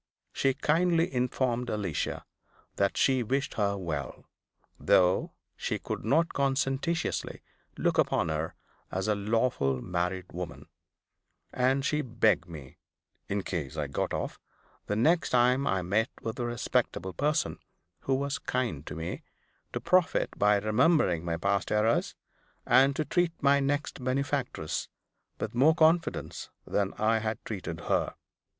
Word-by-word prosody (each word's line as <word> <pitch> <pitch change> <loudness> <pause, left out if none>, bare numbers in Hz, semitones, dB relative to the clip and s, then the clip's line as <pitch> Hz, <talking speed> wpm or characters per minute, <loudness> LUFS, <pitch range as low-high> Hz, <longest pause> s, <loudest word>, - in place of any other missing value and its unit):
She 135 -1 +1
kindly 165 +2 +2
informed 125 -1 0
Alicia 100 -7 -2 0.5
that 100 0 +1
she 130 -2 +3
wished 135 +4 -1
her 100 -2 0
well, 75 -7 -5 0.5
though 90 0 +3 0.2
she - - -2
could - - -5
not 155 +10 +2
conscientiously 135 +4 -1 0.3
look - - +1
upon - - +2
her 80 +1 -2 0.4
as 95 +2 -2
a 105 - +3
lawful 105 - 0
married 90 +3 -3
woman; 85 -1 -6 0.9
and 130 +2 +2
she 150 0 +1
begged 110 -8 +1
me 70 -6 -10 0.5
(in 100 0 -1
case 80 -5 -4
I 75 - 0
got 70 - -2
off), - - -3 0.5
the 105 - 0
next 160 +10 +3
time 125 +2 +3
I 95 -1 +1
met 110 +7 +1
with 115 +2 -4
a 120 - -1
respectable 115 -5 -1
person 150 +2 0 0.4
who 135 - 0
was 140 +1 -2
kind 120 - -2
to 75 - -5
me, 80 +1 -5 0.5
to - - -3
profit 180 -2 +2
by 105 0 +4
remembering 105 - +2
my 85 -1 -2
past 100 +2 0
errors, 110 +2 +2 0.5
and 135 +2 +5
to 155 - -1
treat 175 +3 +1
my 140 0 +4
next 140 -1 -1
benefactress 130 - -1 0.5
with - - -3
more 145 +7 +5
confidence 165 +1 +1 0.2
than 100 -1 0
I 110 +1 +2
had 110 0 -2
treated 90 -6 -5
her. - - 0
115 Hz, 140 wpm, -29 LUFS, 95-140 Hz, 0.9 s, and